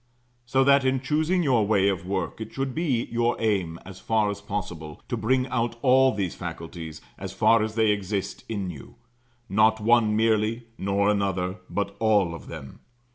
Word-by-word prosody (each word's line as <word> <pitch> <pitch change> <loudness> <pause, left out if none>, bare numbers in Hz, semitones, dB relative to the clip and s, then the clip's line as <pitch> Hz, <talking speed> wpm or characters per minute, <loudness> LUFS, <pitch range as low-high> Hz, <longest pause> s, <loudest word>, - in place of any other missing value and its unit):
So 135 +2 +3
that 140 0 +5
in 130 0 +1
choosing 155 +6 +1
your 120 -8 +2
way 100 -2 +3
of 90 -3 -1
work 95 +2 -3
it 110 - -6
should 135 -1 -2
be 140 -7 0
your 120 0 0
aim, 95 -7 0
as 95 -1 -10
far 110 -2 +1
as 100 0 -7
possible, 90 -7 -6
to 125 - 0
bring 125 +3 +1
out 120 -1 -1
all 130 0 +5
these 100 -5 -2
faculties, 85 -2 -7 0.2
as - - -6
far 115 -1 +4
as 110 0 -2
they 110 -2 +3
exist 100 -1 -3
in 100 -5 -3
you; 70 -5 -12 0.5
not 110 +2 +3
one 110 -1 +3
merely, 110 +1 +1 0.2
nor 100 +1 +1
another, 95 -2 0
but 100 +2 -2
all 105 -6 +3
of 85 - -10
them. 70 -5 -9
105 Hz, 180 wpm, -25 LUFS, 95-120 Hz, 0.5 s, that